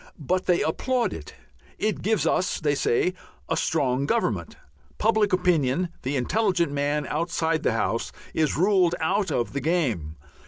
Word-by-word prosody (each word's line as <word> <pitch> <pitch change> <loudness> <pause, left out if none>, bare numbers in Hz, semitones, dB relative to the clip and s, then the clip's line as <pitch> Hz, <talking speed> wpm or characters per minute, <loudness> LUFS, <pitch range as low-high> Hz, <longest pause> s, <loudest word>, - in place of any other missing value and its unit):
But 180 +5 -1
they 175 -1 +3
applaud 240 +7 0
it. 75 - -9 0.4
It 215 0 -1
gives 220 +1 +1
us, 185 - +1
they 150 -3 +1
say, 140 +5 +1 0.3
"a - - 0
strong 140 -3 0
Government." - - -1 0.4
Public 215 -1 +2
opinion, 180 -3 +2
the 135 +3 -2
intelligent 180 - +1
man 145 +1 0
outside 160 0 -1
the - - +1
House, 115 +1 -1 0.2
is 155 -2 +1
ruled 180 -1 +3
out 195 +5 +1
of 120 -4 -1
the 140 - -2
game. 125 - -1
160 Hz, 150 wpm, -25 LUFS, 140-185 Hz, 0.4 s, they